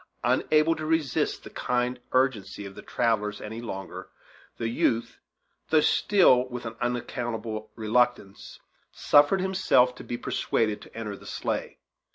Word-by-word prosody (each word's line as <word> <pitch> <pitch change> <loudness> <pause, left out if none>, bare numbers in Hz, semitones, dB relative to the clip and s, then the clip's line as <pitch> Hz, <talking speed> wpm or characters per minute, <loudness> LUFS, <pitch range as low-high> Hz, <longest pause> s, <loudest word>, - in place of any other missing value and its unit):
Unable 155 +1 +3
to 155 - -5
resist 155 -5 0
the - - -10
kind 125 0 -1
urgency 130 -6 0
of 100 - -8
the - - -10
travellers 105 -3 -1
any 110 +2 -7
longer, 95 -5 -7 0.5
the 115 - -2
youth, 115 0 0 0.5
though 160 - +5
still 150 -10 +4
with 125 -1 -6
an 115 -1 -5
unaccountable 120 -3 -3
reluctance, 115 -2 -1 0.3
suffered 145 +6 +4
himself 135 -10 +3
to - - -11
be 120 - -4
persuaded 110 -3 -1
to - - -14
enter 105 -3 -4
the - - -14
sleigh. - - -3
120 Hz, 140 wpm, -27 LUFS, 110-130 Hz, 0.5 s, though